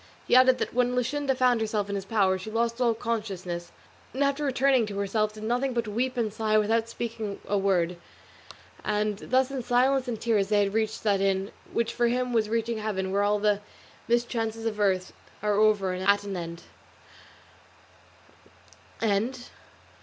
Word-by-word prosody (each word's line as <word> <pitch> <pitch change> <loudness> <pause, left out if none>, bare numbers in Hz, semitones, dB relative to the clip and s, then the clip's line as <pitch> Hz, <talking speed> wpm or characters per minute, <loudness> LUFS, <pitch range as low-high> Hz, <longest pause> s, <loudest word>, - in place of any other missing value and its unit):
He - - +4
added 255 0 +6
that - - -3
when 250 +1 +1
Luscinda 265 +2 0
found 250 -3 +3
herself 215 -2 -1
in 200 - -4
his 195 -1 -3
power 195 -4 +2
she 190 - -7
lost 230 +2 -1
all 235 -2 +3
consciousness, 195 -7 -4 0.4
and 275 - +1
after 280 +1 0
returning 265 -3 +2
to 200 -1 -6
herself 210 +2 0
did 215 0 -10
nothing 245 +3 0
but 235 -2 -1
weep 250 +5 -1
and 220 -3 -1
sigh 215 -1 +1
without 225 +2 +1
speaking 225 -3 -5
a 205 - 0
word; 180 -3 +1 0.9
and 210 -1 -1
thus 260 +2 +1
in 270 -2 -3
silence 255 +2 +2
and 230 -3 -3
tears 215 -4 +1
they 205 -1 +3
reached 220 +2 -2
that 200 -3 +2
inn, 195 +1 0 0.2
which 230 0 -1
for 240 -1 +2
him 250 +1 0
was 220 -2 +1
reaching 230 0 -1
heaven 190 -3 -2
where 200 +1 +1
all 205 +1 +2
the 205 0 +1 0.5
mischances 230 -1 -1
of 215 -2 -2
earth 190 -3 +1 0.3
are 210 0 +2
over 205 -2 +3
and 185 - -4
at 200 0 +4
an 200 -1 -5
end. 170 -1 -6
220 Hz, 170 wpm, -27 LUFS, 200-240 Hz, 0.9 s, added